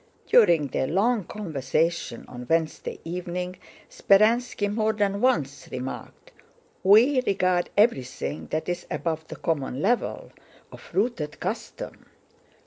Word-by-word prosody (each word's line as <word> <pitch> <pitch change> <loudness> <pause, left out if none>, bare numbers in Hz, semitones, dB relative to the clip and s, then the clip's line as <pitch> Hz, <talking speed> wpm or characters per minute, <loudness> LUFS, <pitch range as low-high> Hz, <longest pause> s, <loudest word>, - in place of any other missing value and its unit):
During 165 - +5
their 130 - -1
long 205 - +1
conversation 160 - -2
on 125 -1 -9
Wednesday 160 -1 0
evening, 180 +1 -4 0.3
Speránski 215 0 +3
more 220 0 +1
than 200 -1 0
once 145 - 0
remarked: 130 +1 -7 0.5
"We 235 +8 +6
regard 185 -2 +1
everything 150 - +1
that 155 - -3
is 175 0 -3
above 160 -1 -3
the - - -7
common 140 -5 -2
level 230 +9 0 0.4
of - - -13
rooted 195 -7 -1
custom..." - - -6
180 Hz, 115 wpm, -25 LUFS, 155-215 Hz, 0.5 s, We